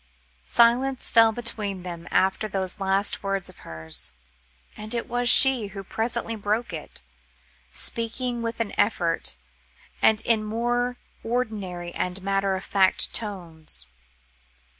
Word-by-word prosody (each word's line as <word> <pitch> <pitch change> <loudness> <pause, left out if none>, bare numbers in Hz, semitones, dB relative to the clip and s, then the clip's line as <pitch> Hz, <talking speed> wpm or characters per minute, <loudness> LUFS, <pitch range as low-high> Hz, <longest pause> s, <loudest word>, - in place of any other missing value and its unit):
Silence 245 +3 +3
fell 225 -1 +6
between 210 -5 -3
them 170 -2 -7
after 190 +3 +2
those 190 -2 -3
last 195 +1 +1
words 195 -2 -1
of 185 - -15
hers; 80 -3 -2 0.6
and 215 +3 -3
it 235 - -2
was 245 0 +1
she 265 -6 +6
who 195 0 -8
presently 225 +2 -2
broke 210 -1 -1
it, 155 -2 -8 0.7
speaking 235 - -2
with 230 0 -4
an 225 -3 -2
effort, 170 - +1 0.7
and 220 0 +5
in 225 -1 +2
more 240 +3 -1 0.3
ordinary 205 -8 -3
and 180 +1 -3
matter 195 0 +1
of 190 - -5
fact 190 -2 +2
tones. 170 - -3
210 Hz, 125 wpm, -25 LUFS, 190-230 Hz, 0.7 s, fell